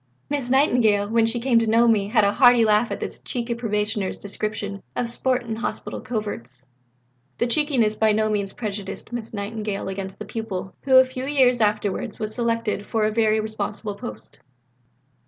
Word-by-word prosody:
Miss 280 -4 -2
Nightingale, 240 -7 +3
when 225 +1 +2
she 235 +1 +2
came 235 -1 +3
to 230 - 0
know 230 +2 +4
me, 210 -3 +3
had 215 0 +3
a 200 - +3
hearty 245 -1 +6
laugh 215 +2 +3
at - - -4
this - - -5
cheeky 240 -1 -2
probationer's 210 -3 -2
description 205 -1 -4
of 245 - -1
sport 250 +1 0
in 225 -2 -4
Hospital 230 - -4
coverts." 130 - -5 0.7
The - - +1
cheekiness 245 -4 +2
by 220 0 +3
no 215 +1 +2
means 205 -2 -1
prejudiced 205 -3 -6
Miss 235 -2 -5
Nightingale 210 -1 -4
against 190 0 -6
the - - -7
pupil, 190 -5 -5
who, 260 -1 +6
a 260 - +9
few 255 0 -6
years 255 -4 +3
afterwards, 210 -2 0
was 215 -1 -4
selected 230 -3 -1
for 220 -1 +1
a 215 - +1
very 220 0 +2
responsible 215 -1 -4
post. 110 - -9
220 Hz, 175 wpm, -23 LUFS, 205-240 Hz, 0.7 s, a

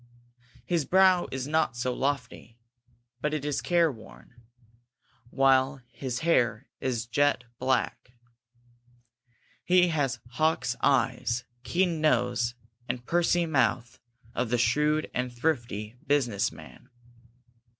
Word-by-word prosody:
His 170 -3 0
brow 185 +2 +4
is 130 0 -4
not 155 -5 0
so 125 +1 -1
lofty, 125 -4 -3 0.6
but 150 +1 0
it 145 -2 -4
is 145 -2 -1
care 170 -3 +2
worn, 115 0 -15 1.0
while 135 0 +3
his 130 -1 -4
hair 125 -7 +2
is 125 -3 -2
jet 145 +2 +1 0.2
black. 130 -1 -1 1.5
He 180 0 +4
has 145 -6 0
the 120 - -23
hawk's 130 -2 0
eye, 135 -2 +2 0.4
keen 170 +3 0
nose, 120 -4 +1 0.3
and 120 0 -3
pursy 175 +1 +2
mouth 130 -6 0 0.3
of 125 -1 -1
the 120 - +1
shrewd 150 +5 +2
and 125 0 -2
thrifty 120 -5 -2
business 125 -8 +1
man. - - -14
135 Hz, 115 wpm, -28 LUFS, 120-155 Hz, 1.5 s, brow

